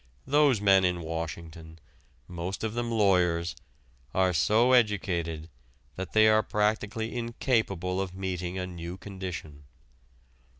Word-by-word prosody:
Those 145 -4 +4
men 95 -2 +5
in 90 -1 +1
Washington, 80 0 -6 0.5
most 90 +3 -5
of 110 -1 -2
them 120 0 -2
lawyers, 90 -7 +2 0.6
are 95 -1 +3
so 110 - +3
educated 85 -9 +1 0.5
that 95 0 -6
they 110 0 +6
are 110 0 +5
practically 110 +2 -1
incapable 110 -6 -1
of 95 -1 -5
meeting 90 -1 -3
a 90 - -2
new 85 0 -7
condition. 90 -7 -7
95 Hz, 120 wpm, -28 LUFS, 85-110 Hz, 0.6 s, they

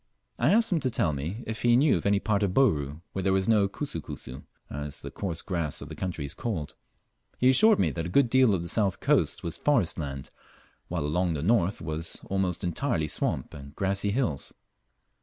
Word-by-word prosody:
I 125 +7 +3
asked 225 +1 +3
him 175 - +2
to 130 -3 0
tell 85 -9 0
me 80 - -4
if 110 0 -5
he 120 -1 +4
knew 140 +3 +4
of - - -1
any 100 0 +3
part 105 -1 0
of 95 -3 0
Bouru 75 - +2
where 95 - -2
there 95 +1 +1
was 95 0 +1
no 105 -3 +4
"kusu 100 - -5
kusu," 65 -1 -8 0.3
as 75 0 -6
the - - -6
coarse 85 -5 -4
grass 85 -6 -2
of 70 - -8
the 80 - -7
country 85 -5 -4
is 70 - -6
called. 95 -11 -4 0.6
He 130 +1 +5
assured 215 +9 +6
me - - +2
that 85 0 -4
a - - -6
good 135 +8 +4
deal 125 -3 +4
of 85 - -3
the - - -5
south 100 +1 +1
coast - - +1
was 85 - -3
forest 115 - +1
land, 70 -3 -5 0.6
while 75 - -2
along 85 +2 0
the 70 - -3
north 100 -1 +2
was 80 +1 -2
almost 95 -3 -1
entirely 85 - -1
swamp - - -2
and 70 0 -11
grassy 100 +1 0
hills. 100 - -1
95 Hz, 215 wpm, -27 LUFS, 80-115 Hz, 0.6 s, assured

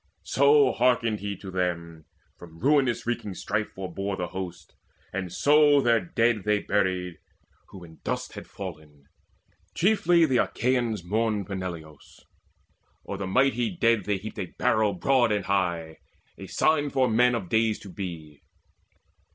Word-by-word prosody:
So 140 -1 +4
hearkened 115 -3 +1
he 100 -1 -4
to 95 0 -9
them: 85 -3 -3 0.3
From 85 -2 -13
ruin 135 - +3
wreaking 110 -5 -3
strife 105 +3 -2
forebore 95 +1 -4
the 90 -1 -3
hosts; 90 -3 -7 0.4
And 95 -2 -4
so 145 0 +5
their 120 -4 +3
dead 115 +4 0
they 105 0 +2
buried, 95 -4 -1 0.5
who 95 -3 -12
in 80 -1 -14
dust - - -3
Had - - -9
fallen. 75 -7 -9 0.7
Chiefly 175 -3 +3
the 130 -5 +1
Achaeans 120 -7 0
mourned 105 +2 -1
Peneleos; 85 -6 -8 0.9
o'er 100 - -4
the 95 -1 -4
mighty 130 - +1
dead 115 - +2
they 105 -1 0
heaped 110 +3 -8
A 95 - -3
barrow 110 -1 +2
broad 120 +5 +2
and 105 -2 -1
high, 85 -5 -1 0.4
a - - -10
sign 150 -2 +1
for 130 -2 +2
men 120 +2 +3
Of 100 -6 -4
days 110 +1 +1
to 100 - -10
be. 85 -6 -7
105 Hz, 145 wpm, -26 LUFS, 90-120 Hz, 0.9 s, so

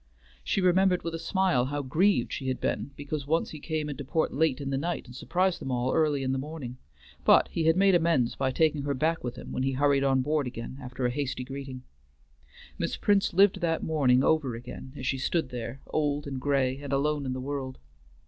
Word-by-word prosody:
She 195 - 0
remembered 185 0 +3
with 165 - -3
a 165 - -3
smile 185 -10 +1
how 145 +2 -3
grieved 155 +1 +2
she 130 - -4
had 130 - -1
been - - -2
because 145 0 -5
once 165 +3 +1
he 155 - -8
came 155 -1 -3
into 145 -1 -5
port 160 +4 0
late 150 -2 +1
in 140 -1 -4
the 135 - 0
night 170 +4 -3
and 125 -1 -12
surprised 180 +6 0
them - - -4
all 125 0 0
early 150 -3 +2
in 130 - 0
the 135 - 0
morning, 135 -4 -7 0.4
but - - +5
he 165 - -1
had 160 +2 +4
made 195 0 +5
amends 165 -8 +2
by 130 - 0
taking 155 +2 +2
her 140 0 -1
back 160 +5 0
with 120 -1 -4
him - - -9
when - - -2
he 135 0 0
hurried 140 +1 +3
on 135 -1 +3
board 150 -1 0
again 125 +2 -7
after 125 0 -4
a 120 - +2
hasty 130 -1 -3
greeting. 135 -1 -7 1.0
Miss - - -2
Prince 205 -1 +2
lived 190 0 +4
that 165 -1 0
morning 135 -5 +3
over 145 -7 +2
again 125 +2 -9
as 130 - -6
she 135 0 0
stood 160 +1 0
there, 120 +1 -6
old 145 -1 -1
and 135 -2 -5
gray 135 -2 +1
and 145 -1 -7
alone 145 +1 +1
in 130 - -1
the 130 - -4
world. 130 -1 -4
140 Hz, 225 wpm, -28 LUFS, 130-160 Hz, 1.0 s, but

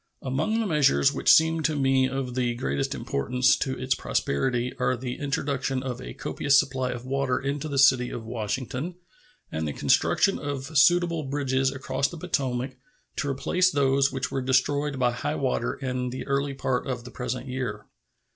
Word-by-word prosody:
Among 155 - 0
the 225 - 0
measures 140 - +3
which - - +3
seem 160 0 +5
to 155 0 0
me 135 -2 +2
of 130 -1 -3
the 120 -1 0
greatest 70 - -2
importance 125 - +1
to 135 -1 -2
its 130 +1 0
prosperity 125 - -1
are 125 - +1
the 125 0 -5
introduction 135 -2 -1
of 130 -2 -4
a - - -8
copious 140 -1 +2
supply 130 -2 -1
of 125 0 -5
water 135 -1 0
into 140 +2 -3
the 140 -2 -3
city 130 -2 +5
of 115 - -6
Washington 125 - -3 0.6
and 80 0 -2
the 75 - -3
construction - - +2
of 140 +1 -5
suitable 170 +3 +4
bridges 135 -1 0
across 135 0 -1
the 175 - -9
Potomac 130 -6 -2 0.4
to 140 - -1
replace 180 +7 +2
those 140 -3 +2
which 130 -2 -3
were 135 - -1
destroyed 140 +2 +1
by 125 -1 +2
high 120 - -3
water - - -1
in 125 -1 -3
the 130 +1 -6
early 140 0 -1
part 130 0 -1
of 125 -3 -3
the 125 - -10
present 125 +1 -4
year. 125 -5 -4
130 Hz, 175 wpm, -26 LUFS, 125-140 Hz, 0.6 s, seem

